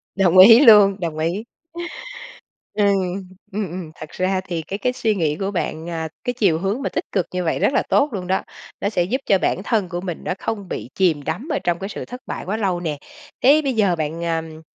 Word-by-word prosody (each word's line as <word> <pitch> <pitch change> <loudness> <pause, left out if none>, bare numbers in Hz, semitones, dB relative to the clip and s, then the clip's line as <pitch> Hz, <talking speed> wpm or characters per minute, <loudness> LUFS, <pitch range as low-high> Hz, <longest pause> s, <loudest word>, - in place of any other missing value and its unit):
Đồng 185 -2 +3
ý 225 +5 +10
luôn, 210 -7 +7
đồng 165 -4 -3
ý. 170 +7 -1 1.3
Ừm, 210 - +2 0.7
ừm, 200 -1 -3
ừm. 170 -2 -7
Thật 155 - -9
ra 185 +1 0
thì 170 -3 -2
cái 195 +5 -6
cái 250 +4 0
suy 225 -4 0
nghĩ 155 -5 0
của 195 0 -2
bạn, 170 -3 -3
à, 160 -1 -3
cái 245 - -1
chiều 195 -9 +2
hướng 195 +8 -1
mà 275 - -1
tích - - -3
cực 185 -4 0
như 180 0 -1
vậy 165 - -1
rất - - +2
là - - +2
tốt 290 - +3
luôn 185 -3 -4
đó. 190 +1 0 0.4
Nó 200 - +1
sẽ 180 -5 +1
giúp 245 +10 -2
cho 195 - +4
bản 190 - -1
thân 210 -5 0
của 175 +1 -4
mình 180 -3 -5
nó - - -1
không 205 -4 -4
bị - - -5
chìm 165 -6 +2
đắm 160 - -4
ở - - 0
trong 175 -1 0
cái 195 - -5
sự - - -6
thất 250 +1 -9
bại - - -5
quá 205 +4 -2
lâu 190 -5 0
nè. 160 -4 -3 0.5
Thế 290 +4 +6
bây 270 -2 0
giờ 200 -6 +2
bạn, 160 +1 -3
ờm, 160 -1 -3
185 Hz, 235 wpm, -21 LUFS, 170-210 Hz, 1.3 s, ý